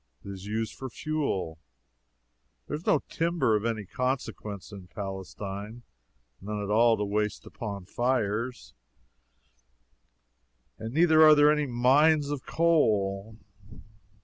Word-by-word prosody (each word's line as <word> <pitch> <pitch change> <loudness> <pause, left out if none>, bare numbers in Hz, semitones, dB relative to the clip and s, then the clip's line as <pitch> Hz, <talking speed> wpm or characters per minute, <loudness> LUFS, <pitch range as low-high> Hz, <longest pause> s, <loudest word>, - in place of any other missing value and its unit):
It - - -7
is 95 0 -9
used 110 0 -2
for 130 - -7
fuel. 115 - -3 1.1
There - - -4
is 155 - -9
no - - +3
timber 165 -9 +1
of 105 +1 -1
any 110 -3 -2
consequence 110 -4 -4
in 95 -3 -10
Palestine 100 +3 -7 0.6
none 105 +2 -4
at 100 - -4
all 115 +1 +4
to 105 - -1
waste 105 +1 -2
upon 100 -4 -7
fires 120 +1 -2 2.1
and 110 +1 -5
neither 160 +2 +5
are 155 -1 +9
there 145 0 +6
any 150 -1 0
mines 140 +5 +3
of 145 -3 -5
coal. 110 -11 +1
115 Hz, 120 wpm, -28 LUFS, 100-145 Hz, 2.1 s, are